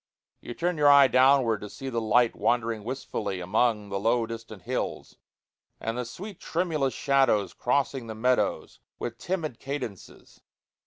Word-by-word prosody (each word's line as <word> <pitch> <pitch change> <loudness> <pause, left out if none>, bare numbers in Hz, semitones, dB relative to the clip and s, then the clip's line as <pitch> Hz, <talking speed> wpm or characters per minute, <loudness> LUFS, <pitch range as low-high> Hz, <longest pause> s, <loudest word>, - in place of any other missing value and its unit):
You 120 - -8
turn 175 -1 -1
your 145 -1 +6
eye 140 -1 +8
downward 130 -4 +4
to 105 - -7
see 135 - -8
the 120 -3 -2
light 115 +2 +3
wandering 115 -3 0
wistfully 105 -6 -4
among 105 +3 +1
the 100 0 -2
low 115 +3 +2
distant 115 -4 -9
hills, - - -4 0.6
and 115 +1 -3
the 125 0 -3
sweet 190 - -9
tremulous 160 -6 -1
shadows 130 -9 +2
crossing 135 -1 -1
the 110 - -6
meadows 125 +3 0 0.2
with 115 -1 -5
timid 165 -9 -3
cadences. 130 -8 -7
120 Hz, 150 wpm, -27 LUFS, 110-140 Hz, 0.6 s, eye